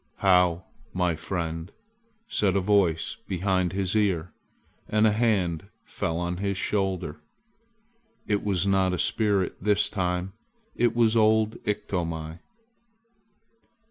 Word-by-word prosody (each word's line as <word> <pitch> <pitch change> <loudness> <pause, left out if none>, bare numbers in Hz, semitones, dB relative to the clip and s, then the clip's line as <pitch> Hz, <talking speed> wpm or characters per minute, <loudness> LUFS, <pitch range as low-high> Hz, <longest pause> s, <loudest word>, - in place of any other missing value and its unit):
"How, 90 -2 +3 0.3
my 90 -2 +1
friend!" 80 +1 -4 0.6
said 100 - +1
a - - +4
voice 95 -4 +1
behind 95 -1 0
his 95 +1 -1
ear, 90 -6 +1 0.6
and 110 +1 +3
a 110 - +5
hand 100 -6 0 0.2
fell 80 - -3
on 90 0 -2
his 100 0 -2
shoulder. 95 -6 -1 1.1
It 105 -1 0
was 100 -3 +1
not 95 -2 +2
a - - -1
spirit 100 -1 +1
this 105 +1 +2
time. 90 -1 -2 0.4
It 120 -1 +1
was 115 -1 +3
old 110 0 +3
Iktomi. 85 -5 -3
95 Hz, 115 wpm, -26 LUFS, 90-105 Hz, 1.1 s, a